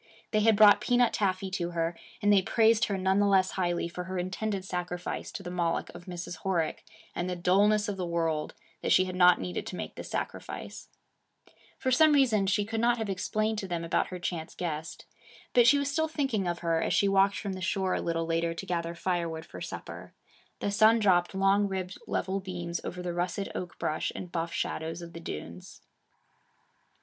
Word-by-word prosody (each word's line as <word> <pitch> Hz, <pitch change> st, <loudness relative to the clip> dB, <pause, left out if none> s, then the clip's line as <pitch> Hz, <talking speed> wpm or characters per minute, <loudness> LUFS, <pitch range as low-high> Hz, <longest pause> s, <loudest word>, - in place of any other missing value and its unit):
They 215 Hz, -, +3 dB
had 220 Hz, 0 st, +4 dB
brought 205 Hz, 0 st, +7 dB
peanut 245 Hz, +1 st, +3 dB
taffy 190 Hz, -1 st, 0 dB
to 175 Hz, -2 st, -2 dB
her, 165 Hz, +1 st, 0 dB, 0.3 s
and 205 Hz, 0 st, +5 dB
they 195 Hz, -, +5 dB
praised 225 Hz, +3 st, +3 dB
her 200 Hz, -3 st, -2 dB
none 190 Hz, +1 st, +2 dB
the 205 Hz, -, +4 dB
less 190 Hz, -1 st, +3 dB
highly 175 Hz, -2 st, -1 dB
for 180 Hz, +1 st, -6 dB
her 185 Hz, +1 st, -4 dB
intended 190 Hz, +2 st, -2 dB
sacrifice 180 Hz, -1 st, -4 dB
to 195 Hz, -, -6 dB
the 175 Hz, -, -6 dB
Moloch 170 Hz, -2 st, -1 dB
of 175 Hz, 0 st, -11 dB
Mrs. 175 Hz, -1 st, -6 dB
Horick 170 Hz, -5 st, -1 dB, 0.3 s
and 175 Hz, +1 st, -2 dB
the 180 Hz, -, -2 dB
dullness 205 Hz, +5 st, +3 dB
of 205 Hz, -2 st, -3 dB
the 185 Hz, -, -2 dB
world 165 Hz, -2 st, -1 dB, 0.3 s
that -, -, -1 dB
she 185 Hz, -, +5 dB
had 185 Hz, -1 st, -5 dB
not 180 Hz, -1 st, +6 dB
needed 180 Hz, -, -4 dB
to -, -, -5 dB
make -, -, -5 dB
this -, -, -8 dB
sacrifice. -, -, -5 dB, 0.9 s
For 260 Hz, -, -1 dB
some 310 Hz, +4 st, +6 dB
reason, 235 Hz, -8 st, +3 dB
she 205 Hz, +1 st, +2 dB
could 225 Hz, +1 st, -3 dB
not 240 Hz, 0 st, +3 dB
have 220 Hz, -3 st, -2 dB
explained 215 Hz, +3 st, -1 dB
to 195 Hz, -, -5 dB
them 170 Hz, -2 st, -3 dB
about 165 Hz, -, +1 dB
her 185 Hz, -, -6 dB
chance 175 Hz, -2 st, -4 dB
guest. 160 Hz, -2 st, -5 dB, 0.5 s
But 240 Hz, -1 st, +6 dB
she 285 Hz, -, +7 dB
was 280 Hz, 0 st, -1 dB
still 315 Hz, +2 st, +1 dB
thinking 270 Hz, -, -1 dB
of 175 Hz, 0 st, -2 dB
her, 165 Hz, -1 st, +2 dB
as -, -, +1 dB
she 200 Hz, -, +3 dB
walked 195 Hz, 0 st, +3 dB
from 200 Hz, 0 st, -4 dB
the 185 Hz, -, -7 dB
shore 185 Hz, 0 st, 0 dB
a -, -, -1 dB
little 165 Hz, -1 st, -1 dB
later 165 Hz, 0 st, 0 dB
to 195 Hz, -, -6 dB
gather 170 Hz, -2 st, -2 dB
firewood 170 Hz, -2 st, -2 dB
for -, -, -10 dB
supper. -, -, -8 dB, 0.5 s
The 205 Hz, -, 0 dB
sun 220 Hz, +2 st, +5 dB
dropped 185 Hz, -4 st, +2 dB
long 195 Hz, +1 st, +3 dB
ribbed 190 Hz, -1 st, -4 dB
level 195 Hz, +1 st, -1 dB
beams 175 Hz, -3 st, -5 dB
over 180 Hz, 0 st, -5 dB
the 175 Hz, -1 st, -3 dB
russet 175 Hz, +3 st, -2 dB
oak 180 Hz, -2 st, -6 dB
brush 155 Hz, -, -1 dB
and 180 Hz, -, -7 dB
buff 165 Hz, -1 st, -2 dB
shadows 165 Hz, +2 st, -3 dB
of 170 Hz, 0 st, -10 dB
the 165 Hz, -, -7 dB
dunes. 85 Hz, -, -8 dB
185 Hz, 205 wpm, -29 LUFS, 175-205 Hz, 0.9 s, brought